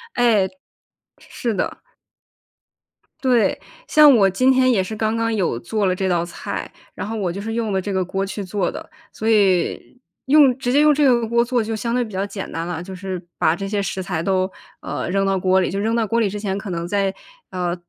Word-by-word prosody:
哎。 220 Hz, -6 st, +3 dB, 0.7 s
是 235 Hz, -2 st, -4 dB
的。 195 Hz, -, -3 dB, 1.4 s
对， 245 Hz, -7 st, +2 dB, 0.3 s
像 300 Hz, -2 st, +7 dB
我 195 Hz, -3 st, +5 dB
今 255 Hz, +8 st, +3 dB
天 255 Hz, -1 st, +4 dB
也 195 Hz, -5 st, +2 dB
是 220 Hz, -, -6 dB
刚 220 Hz, +1 st, 0 dB
刚 230 Hz, 0 st, 0 dB
有 185 Hz, -, 0 dB
做 205 Hz, +4 st, -1 dB
了 185 Hz, -, +1 dB
这 190 Hz, 0 st, -1 dB
道 175 Hz, -2 st, +1 dB
菜， 175 Hz, -, -6 dB, 0.2 s
然 -, -, -5 dB
后 225 Hz, -, -4 dB
我 190 Hz, -4 st, -1 dB
就 195 Hz, +3 st, -6 dB
是 225 Hz, +2 st, -4 dB
用 225 Hz, -2 st, -1 dB
了 190 Hz, -, 0 dB
这 200 Hz, -, -4 dB
个 190 Hz, -1 st, +1 dB
锅 195 Hz, +2 st, -2 dB
去 200 Hz, +1 st, -5 dB
做 190 Hz, -1 st, -2 dB
的。 -, -, -9 dB, 0.2 s
所 220 Hz, -, -2 dB
以， 195 Hz, 0 st, +1 dB, 0.3 s
用 275 Hz, -2 st, +5 dB
直 250 Hz, -2 st, -2 dB
接 285 Hz, -, +4 dB
用 300 Hz, 0 st, +6 dB
这 295 Hz, +1 st, +1 dB
个 240 Hz, -4 st, +3 dB
锅 235 Hz, +1 st, +3 dB
做 240 Hz, -1 st, 0 dB
就 225 Hz, +1 st, -3 dB
相 230 Hz, +2 st, -2 dB
对 250 Hz, -, +2 dB
比 220 Hz, -, -9 dB
较 190 Hz, +1 st, -2 dB
简 200 Hz, -1 st, -7 dB
单 165 Hz, +1 st, -4 dB
啦， 175 Hz, -2 st, -4 dB
就 190 Hz, +2 st, -8 dB
是， 185 Hz, -1 st, -6 dB
把 160 Hz, -, +2 dB
这 195 Hz, +2 st, -5 dB
些 205 Hz, 0 st, -1 dB
食 190 Hz, -1 st, -3 dB
材 175 Hz, -3 st, -2 dB
都， 190 Hz, +1 st, 0 dB, 0.3 s
呃， -, -, -4 dB
扔 195 Hz, +1 st, +1 dB
到 195 Hz, -1 st, +1 dB
锅 185 Hz, +1 st, +3 dB
里， -, -, -1 dB
就 195 Hz, -, -2 dB
扔 220 Hz, +3 st, 0 dB
到 230 Hz, -1 st, +1 dB
锅 230 Hz, +2 st, 0 dB
里 220 Hz, -3 st, +2 dB
之 205 Hz, +2 st, -5 dB
前 195 Hz, -2 st, -2 dB
可 200 Hz, 0 st, -6 dB
能 170 Hz, -1 st, -3 dB
再， 195 Hz, 0 st, 0 dB, 0.4 s
呃， 180 Hz, -1 st, -2 dB
200 Hz, 245 characters per minute, -21 LUFS, 185-230 Hz, 1.4 s, 像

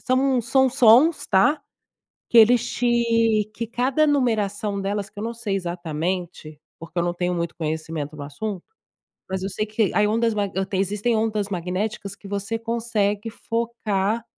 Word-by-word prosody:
são 260 Hz, 0 st, +2 dB
são 265 Hz, +3 st, +3 dB
sons, 265 Hz, +6 st, +5 dB
tá? 250 Hz, +11 st, +3 dB, 0.7 s
Que 235 Hz, -, +4 dB
eles 240 Hz, +2 st, +5 dB
te 230 Hz, -2 st, +2 dB
que 230 Hz, -, -3 dB
cada 260 Hz, +6 st, +1 dB
numeração 210 Hz, -7 st, 0 dB
delas, 200 Hz, +1 st, -2 dB
que 205 Hz, +1 st, -11 dB
eu -, -, -4 dB
não 230 Hz, +1 st, -3 dB
sei 225 Hz, -4 st, -3 dB
exatamente, 170 Hz, -2 st, -4 dB, 0.2 s
porque 165 Hz, +2 st, -5 dB
eu -, -, +1 dB
não 175 Hz, 0 st, -1 dB
tenho 180 Hz, 0 st, -1 dB
muito 170 Hz, 0 st, -3 dB
conhecimento 155 Hz, -1 st, -4 dB
no 145 Hz, -, -6 dB
assunto. 175 Hz, +7 st, -5 dB, 0.7 s
Mas 190 Hz, 0 st, -2 dB
eu 195 Hz, -, -2 dB
sei 215 Hz, +2 st, -2 dB
que 215 Hz, -1 st, 0 dB
aí 210 Hz, 0 st, +4 dB
ondas 230 Hz, +1 st, +1 dB
mag 205 Hz, -2 st, -1 dB, 0.2 s
tem, 190 Hz, -1 st, -2 dB
existem 210 Hz, +4 st, 0 dB
ondas 215 Hz, -2 st, 0 dB
magnéticas 195 Hz, +2 st, -3 dB
que 200 Hz, -, -13 dB
você 200 Hz, +3 st, -3 dB
consegue 225 Hz, -2 st, -1 dB
focar 225 Hz, -2 st, -2 dB
210 Hz, 165 wpm, -23 LUFS, 190-235 Hz, 0.7 s, sons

